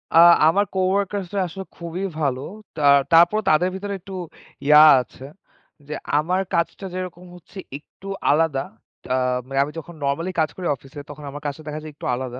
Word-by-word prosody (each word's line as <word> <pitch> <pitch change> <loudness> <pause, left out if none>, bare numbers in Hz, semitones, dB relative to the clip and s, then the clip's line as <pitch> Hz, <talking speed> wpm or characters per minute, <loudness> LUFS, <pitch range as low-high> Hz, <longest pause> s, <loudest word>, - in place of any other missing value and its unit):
আ - - +8 0.3
আমার 200 +5 +3
co-workers 195 +1 0
রা - - +1
আসলে 190 +3 -8
খুবই 170 +2 -5 0.2
ভালো। 135 -4 0 0.3
তা 155 - -5 0.3
তারপরও 175 +6 +5
তাদের 180 +4 +3
ভিতরে 200 +1 -4
একটু 195 +2 -11 0.5
ইয়া 150 0 +8 0.2
আছে। 125 +2 -12 0.6
যে 150 - -5 0.3
আমার 180 +5 0
কাজটা 170 +3 -1
যেরকম 180 -1 -6
হচ্ছে 180 +3 -16 0.2
একটু 185 +6 -16 0.2
আলাদা। 150 -3 +1 0.5
আ - - +2 0.3
মানে 135 0 -2
আমি 145 - -6
যখন 170 +2 -11
নরমালি 160 +6 -1
কাজ 155 -1 +2
করি 180 -2 -4
অফিসে, 135 +2 -13
তখন 145 0 -10
আমার 145 +1 -8
কাজটা 145 +2 -4
দেখা 150 0 -4
যায় 155 - -8
একটু - - -9
আলাদা। 125 0 -6
165 Hz, 175 wpm, -22 LUFS, 145-185 Hz, 0.6 s, আ